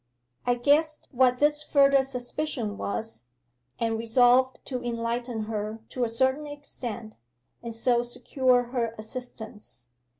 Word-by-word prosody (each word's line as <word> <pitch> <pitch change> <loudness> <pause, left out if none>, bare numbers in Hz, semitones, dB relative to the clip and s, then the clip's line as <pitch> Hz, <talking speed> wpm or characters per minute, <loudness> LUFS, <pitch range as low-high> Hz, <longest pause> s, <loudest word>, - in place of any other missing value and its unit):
'I 245 - +4
guessed 300 +5 +2
what 250 -1 +4
this 295 0 +3
further 275 -2 +5
suspicion 250 -3 -3
was, 200 - -4 0.5
and 225 -1 0
resolved 245 +3 +4
to 250 -2 -4
enlighten 235 -1 -2
her 215 0 -4
to 250 - -2
a 235 - +1
certain 260 +5 +1
extent, 240 -6 -7 0.4
and 235 - -5
so 235 +1 +2
secure 250 +1 +1
her 230 -3 -1
assistance. 215 - -8
245 Hz, 125 wpm, -27 LUFS, 225-265 Hz, 0.5 s, further